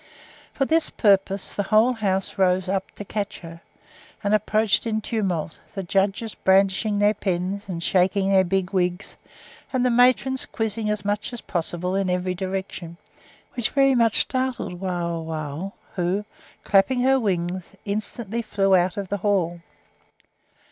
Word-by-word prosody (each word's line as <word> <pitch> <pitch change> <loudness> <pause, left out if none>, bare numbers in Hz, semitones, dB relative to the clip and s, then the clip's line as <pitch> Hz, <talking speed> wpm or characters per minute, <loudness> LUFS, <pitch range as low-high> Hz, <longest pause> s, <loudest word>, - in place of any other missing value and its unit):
For 270 - 0
this 320 +3 +2
purpose 195 -2 +2
the - - -1
whole 215 +5 +4
house 195 -3 -2
rose 185 0 +2
up 190 0 -1
to 205 - -7
catch 205 0 -4
her, 165 -1 -10 0.6
and 205 +1 +1
approached 215 +1 +2
in 220 -1 0
tumult, 190 -8 -2 0.2
the 195 - -3
judges 195 +4 0
brandishing 195 +2 +2
their 205 +1 +4
pens, 195 0 -2
and 170 -3 -4
shaking 190 +2 +2
their 190 -1 +5
big 190 +1 -1
wigs, 180 0 -1 0.6
and 255 -1 +1
the 250 - +3
matrons 255 +2 +3
quizzing 220 -1 -2
as 210 -2 -2
much 205 +3 -1
as 240 - -6
possible 175 +1 -2
in 195 -1 0
every 180 0 0
direction, 185 -2 -5 0.6
which 240 -3 -1
very 275 -1 +4
much 230 -3 +3
startled 255 -8 -2
Wauwau, 170 -2 -3 0.2
who, 185 +3 -1 0.4
clapping 205 +6 +3
her 265 +1 +4
wings, 180 -4 -2 0.2
instantly 215 +2 -2
flew 195 -3 +1
out 180 +1 +1
of 200 -1 -3
the 205 - -1
hall. 180 -4 0
195 Hz, 150 wpm, -24 LUFS, 180-215 Hz, 0.6 s, their